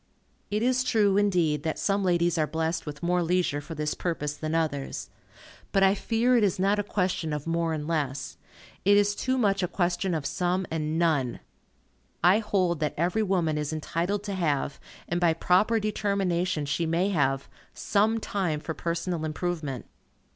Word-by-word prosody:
It 210 +2 0
is 255 +1 +2
true, 215 -6 +3
indeed, 175 -7 +2
that 160 +1 -2
some 200 0 0
ladies 175 -2 +2
are 155 - +2
blessed 160 +1 -2
with 150 +2 -7
more 180 +1 +2
leisure 170 -4 +1
for 160 +2 -8
this 150 0 -1
purpose 150 -4 -3
than 155 +1 -3
others. 150 -4 -2 0.6
But 195 - +3
I 195 0 +6
fear 230 +4 +1
it 235 - +4
is 195 -4 +2
not 200 +2 +2
a - - +1
question 180 -5 -1
of 150 -1 -4
more 165 0 0
and 155 -1 -3
less. 140 -5 -2 0.5
It 205 +1 +5
is 205 0 +3
too 260 +5 -1
much 200 -5 +2
a 180 - +1
question 175 0 0
of 155 -3 -3
some 180 +2 0
and 155 0 -1
none. 150 -8 +1 0.8
I 185 +4 +6
hold 185 -6 0
that 150 -1 -1
every 175 +7 +1
woman 175 -7 +1
is 150 0 -2
entitled 170 +6 -2
to 205 -1 -4
have, 150 -6 -1 0.3
and 175 +1 -1
by 170 -2 +4
proper 190 +7 +3
determination 190 -6 0
she 140 +4 -1
may 170 +4 +1
have, 135 -7 +1 0.3
some 220 +2 +1
time 185 -8 -1
for 160 - -5
personal 170 0 -2
improvement. 155 -4 -3
175 Hz, 175 wpm, -27 LUFS, 155-200 Hz, 0.8 s, I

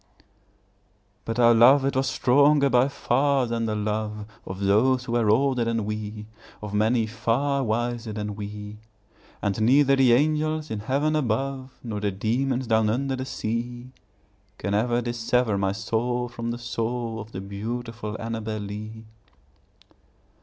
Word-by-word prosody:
But 115 0 -3
our 120 -1 +6
love 130 +4 +6
it 140 - 0
was 130 +1 +1
stronger 140 +2 +4
by 125 +2 +4
far 140 -1 +1
than 115 -1 -2
the 110 - -1
love 105 0 -3 0.2
Of 95 +1 -6
those 120 +6 +3
who 125 - -6
were 120 -3 +2
older 130 +2 +3
than 115 -2 -1
we, 105 0 -5 0.3
Of 105 -1 -7
many 110 +2 +2
far 135 +5 0
wiser 120 0 -2
than 105 -1 -4
we; 105 0 -7 0.7
And 100 +1 -1
neither 135 +4 +5
the 130 -3 +5
angels 155 +3 +1
in 110 - -2
heaven 140 +8 0
above, 135 0 -2
Nor 110 -4 -4
the 105 0 0
demons 120 +6 -1
down 110 -2 +2
under 135 +4 -1
the 130 0 -4
sea, 120 +1 -4 0.7
Can 100 - -3
ever 120 +3 +1
dissever 120 -1 0
my 95 -1 0
soul 115 +4 -1
from 115 0 -5
the 120 - -3
soul 115 -1 -3
Of 110 +1 -9
the 95 - -6
beautiful 110 +2 -5
Annabel 110 -1 -4
Lee. 105 +2 -7
115 Hz, 150 wpm, -25 LUFS, 110-130 Hz, 0.7 s, our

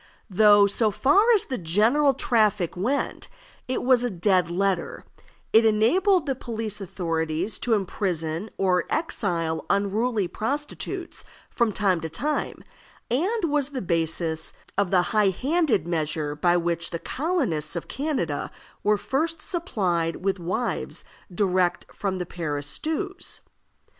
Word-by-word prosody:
Though, 205 +1 +6
so 215 +2 +2
far 385 - +4
as 420 0 +1
the 260 - -4
general 225 - +3
traffic 210 -8 +1
went, 240 +11 -1 0.4
it 255 - -2
was 250 -1 +4
a 245 - 0
dead 180 -2 +2
letter, 195 - -1 0.5
it 225 - +7
enabled 295 - +3
the 275 - 0
police 225 -4 -4
authorities 170 +1 -2
to 235 -2 +2
imprison 180 -2 -2
or 185 -2 +2
exile 170 - -1
unruly 205 +1 +1
prostitutes 285 - -4 0.3
from 235 -3 +1
time 190 -4 +1
to 160 - -4
time, 295 - -2 0.5
and 380 - 0
was 295 -4 +1
the 275 -3 -4
basis 165 -1 -1 0.2
of 200 -2 +1
the 180 -1 +4
high 210 -2 +4
handed 265 - +1
measure 155 -3 -1
by 175 +3 +3
which 170 0 -1
the 170 - -3
colonists 260 - -2
of 170 - -4
Canada 260 - -2 0.3
were 210 0 +3
first 315 +8 -1
supplied 185 - -1
with 195 -1 +1
wives 185 +8 -3 0.3
direct 185 -1 +1
from 195 -3 -2
the 180 - -3
Paris 150 -5 -4
stews. 355 - -3
200 Hz, 135 wpm, -25 LUFS, 175-260 Hz, 0.5 s, it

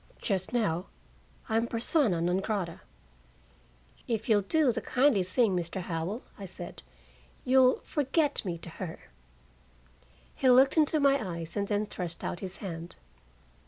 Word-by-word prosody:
Just 190 -4 -1
now 200 -7 0 0.6
I'm 225 +1 +1
persona 230 - +1
non 175 +2 +1
grata." 195 -5 -3 1.3
"If 225 -3 -2
you'll 210 -2 +5
do 290 - +2
the - - -3
kindly 255 -5 +3
thing, 195 +2 +2
Mr. 175 +2 -3
Howell," 175 +5 -3 0.2
I 200 - -6
said, 185 - -7 0.6
"you'll 260 0 +5
forget 295 +1 0
me 175 -4 -3
to 165 - -10
her." 165 -3 -4 1.4
He 260 - +2
looked 260 +2 +6
into 310 -1 +3
my 280 -3 +3
eyes 165 -1 -6
and 200 -1 -1
then 205 0 0
thrust 175 -4 -6
out 175 - -3
his 190 -1 -6
hand. 170 -3 -7
205 Hz, 140 wpm, -29 LUFS, 180-255 Hz, 1.4 s, looked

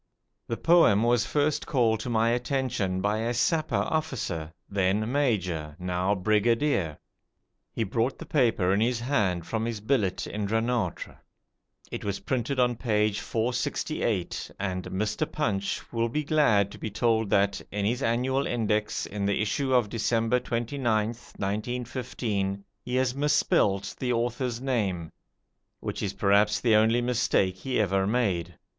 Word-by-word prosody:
The 115 - -2
poem 165 -12 +5
was 120 0 +2
first 150 0 0
called 115 -5 +2
to 115 - -5
my 115 0 +2
attention 120 -7 -1
by 105 +2 0
a 115 +2 -1
Sapper 155 +1 +1
officer, 100 - -2 0.2
then 100 +3 0
Major, 90 - 0
now 90 +2 0
Brigadier. 105 - +1 0.7
He 115 - -1
brought 115 +5 -1
the - - -8
paper 115 - +2
in 100 - +2
his 120 +1 +1
hand 100 - 0
from 110 +5 -2
his 115 -2 -3
billet 105 -4 0
in 105 -1 -3
Dranoutre. 110 -4 -1 0.7
It - - -5
was 100 -1 -2
printed 130 +1 -1
on 120 -2 +2
page 105 -3 +1
468, 115 - -2
and 95 -2 -3
Mr. 105 +10 -2
'Punch' 100 -9 -1
will 115 0 +1
be 150 +6 -1
glad 110 -10 +3
to - - -11
be 110 - -4
told 110 0 +1
that, 100 0 +2
in 100 0 -1
his 120 +5 0
annual 130 +4 +1
index, 105 -3 0
in 100 -1 -3
the 100 - +1
issue 130 +6 0
of 125 -4 +4
December 115 +2 +1
29th, 120 -2 -2
1915, 110 -2 -3 0.2
he 125 - -3
has 130 -1 +2
misspelled 140 -8 +2
the 125 -1 -1
author's 120 0 -1
name, 100 -11 -1 0.7
which - - -4
is 100 - -2
perhaps 100 +1 +3
the 115 -3 +2
only 110 +3 +4
mistake 120 -6 +1
he 130 +7 -2
ever 95 -2 +1
made. 90 - 0
110 Hz, 145 wpm, -27 LUFS, 100-125 Hz, 0.7 s, poem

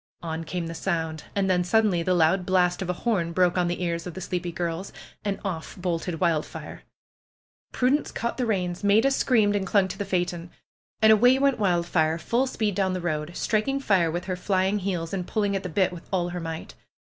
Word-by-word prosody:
On 165 0 -3
came 175 +1 -4
the 165 - -5
sound. 160 -3 -2
And 200 -1 +1
then 180 -1 +2
suddenly 200 -1 +2
the 180 +2 +1
loud 175 +3 +3
blast 180 0 +2
of 185 - -3
a - - +1
horn 180 -5 -1
broke 180 0 +3
on 180 -1 +2
the 175 +1 -2
ears 170 0 -2
of 175 - -7
the - - -5
sleepy 175 -1 -3
girls. 170 +2 -3 0.3
And 200 -1 -2
off 170 -5 -4
bolted 175 -2 -2
Wildfire. 165 -4 -2 0.9
Prudence 265 +4 +1
caught 235 +1 -3
the 250 -2 -1
reins. 180 -3 -1
Maida 215 +6 +4
screamed 220 -6 +3
and 195 -1 -1
clung 200 -2 +3
to 195 - -7
the - - 0
phaeton. 175 -3 -2 0.5
And 220 - +8
away 245 +4 +5
went 275 -2 +2
Wildfire 170 -4 +1
full 240 +10 0
speed 215 -5 -1
down 190 -1 0
the 185 - -2
road, 155 -1 -3
striking 225 +6 0
fire 190 -10 +2
with 175 +3 -3
her 185 -1 -2
flying 190 +2 +1
heels 180 -3 -3
and 180 -2 -3
pulling 205 -2 0
at 195 - -1
the 180 - -5
bit 185 +2 +1
with 175 - -11
all 175 -2 0
her 175 0 -4
might. 165 -1 -6
180 Hz, 210 wpm, -26 LUFS, 170-205 Hz, 0.9 s, And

